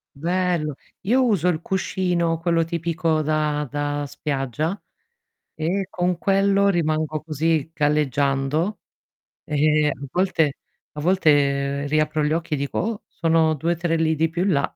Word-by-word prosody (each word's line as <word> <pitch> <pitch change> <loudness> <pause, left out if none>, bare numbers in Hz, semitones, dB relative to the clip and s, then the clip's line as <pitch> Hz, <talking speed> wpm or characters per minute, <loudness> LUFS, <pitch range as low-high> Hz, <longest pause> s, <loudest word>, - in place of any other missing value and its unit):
Bello, 170 -1 -1 0.3
io 250 +7 +2
uso 200 -8 +2
il 170 -2 +1
cuscino, 175 -3 -1
quello 170 -1 +1
tipico 165 -1 -1
da 150 -1 0
da 145 +1 -2
spiaggia 145 - -3 0.8
e 180 +5 -1
con 180 -1 -1
quello 200 +1 +3
rimango 155 -4 0
così, 155 0 0
galleggiando 145 - +1 0.7
e 150 0 +2
a 140 -1 -4
volte 165 -6 +1 0.4
a 150 - -7
volte 145 -5 +2
riapro 155 +1 +1
gli 150 +1 +1
occhi 160 -1 -1
e - - +1
dico: 140 0 -3
"Oh, 225 -1 -2
sono 160 -1 +2
2-3 165 +2 -1
lidi 160 0 +1
più 170 +2 -2
in 195 - +2
là." 140 -2 0
160 Hz, 135 wpm, -23 LUFS, 150-175 Hz, 0.8 s, quello